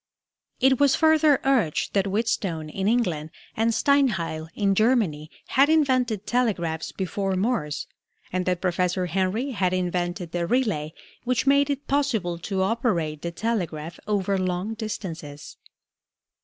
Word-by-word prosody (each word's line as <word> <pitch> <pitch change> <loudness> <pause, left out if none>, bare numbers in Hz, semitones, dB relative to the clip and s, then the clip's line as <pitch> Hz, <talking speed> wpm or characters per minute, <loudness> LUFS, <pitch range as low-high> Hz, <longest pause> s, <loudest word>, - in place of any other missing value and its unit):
It 265 -1 +4
was 285 -2 +4
further 315 -3 +4
urged 245 - +1
that 200 -1 +2
Wheatstone 195 -6 -1
in 195 +3 -2
England 180 -10 0 0.3
and 225 +1 +2
Steinheil 215 - +1
in 200 -1 +2
Germany 195 - +1 0.2
had 275 +3 +4
invented 255 -9 +2
telegraphs 200 -9 -1
before 195 0 -2
Morse, 185 - -1 0.5
and 185 0 -1
that 180 -1 0
Professor 180 0 0
Henry 190 - -1
had 185 -6 0
invented 175 -1 -2
the 175 -1 -1
relay 205 -12 0 0.3
which 250 +1 0
made 280 +1 +4
it 285 0 -2
possible 225 -12 0
to 190 +1 -1
operate 180 - -1
the 170 - -3
telegraph 170 -6 -3
over 200 -2 0
long 185 +3 -2
distances. 175 -10 -7
195 Hz, 130 wpm, -25 LUFS, 175-245 Hz, 0.5 s, It